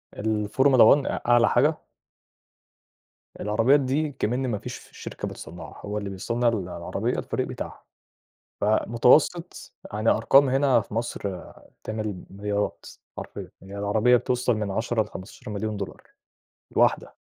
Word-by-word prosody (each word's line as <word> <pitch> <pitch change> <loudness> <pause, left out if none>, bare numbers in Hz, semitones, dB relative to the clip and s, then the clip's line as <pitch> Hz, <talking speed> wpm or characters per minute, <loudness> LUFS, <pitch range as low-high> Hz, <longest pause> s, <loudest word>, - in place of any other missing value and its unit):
الFormula 110 +5 +2
one 140 - -3
أ - - -2
أعلى 120 -1 +5
حاجة. 150 +6 +2 1.6
العربيات 115 +7 +3
دي 140 +3 0
أكمِن 130 -1 -2
ما 110 - -1
فيش - - -9
شركة - - -7
بتصنّعها 85 0 -9
هو 105 +1 -3
اللي 100 -1 -4
بيصنّع 115 +5 -1
ال 115 - +3 0.2
العربية 85 -1 -3
الفريق - - -2
بتاعها، - - -7 0.8
فمتوسط 120 - +2 0.2
يعني 110 +2 +1
أرقام 135 +5 +5
هنا 135 -2 +3
في 105 - -12
مصر، 100 -5 -3 0.4
تعمل 110 -4 -4
مليارات 105 +1 -3 0.3
حرفيًا، - - -7
يعني 95 +1 -9
العربية 110 +4 +3
بتوصل 125 0 0
من 105 -2 -2
10 110 +2 0
ل15.000.000$ 105 +1 -6 0.7
الواحدة. - - +1
110 Hz, 120 wpm, -25 LUFS, 105-125 Hz, 1.6 s, أعلى